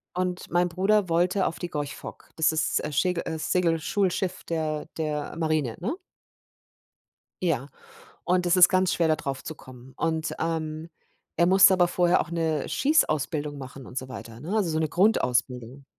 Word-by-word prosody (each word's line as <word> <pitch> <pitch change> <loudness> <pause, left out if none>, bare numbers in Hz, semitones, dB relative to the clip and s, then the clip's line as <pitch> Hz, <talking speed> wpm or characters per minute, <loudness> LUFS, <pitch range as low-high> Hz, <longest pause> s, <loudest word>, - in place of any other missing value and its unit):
Und 180 0 -2
mein 175 +1 +2
Bruder 195 +2 +1
wollte 180 +3 +2
auf - - -4
die 175 - -4
Gorch 145 -2 -4
Fock. - - -11
Das 160 0 +3
ist, 155 0 0
äh, 150 - -4
Schägel 170 +4 0
äh, 160 -1 -4
Segelschulschiff 180 +2 0
der 155 -2 -2
der 150 -2 -3
Marine, 155 -7 0
ne? 235 - -2 1.5
Ja, 145 -6 0 0.6
und 180 0 +1
das 175 +1 +3
ist 180 -1 +8
ganz 185 -1 +2
schwer 170 - +1
da 155 - +3
draufzukommen. 135 -3 -8
Und, 160 -1 -1
ähm, 160 -1 -3 0.5
er 170 - +4
musste 190 +1 +7
aber 180 -1 +4
vorher 175 0 +3
auch - - -4
'ne 160 -3 -1
Schießausbildung 155 - +1
machen 130 -1 -9
und - - -12
so 130 0 -4
weiter, 115 -2 -9
ne? 185 +9 -3
Also, 190 -6 +1
so 155 - 0
'ne 160 - 0
Grundausbildung. 130 - 0
160 Hz, 165 wpm, -26 LUFS, 150-180 Hz, 1.5 s, ist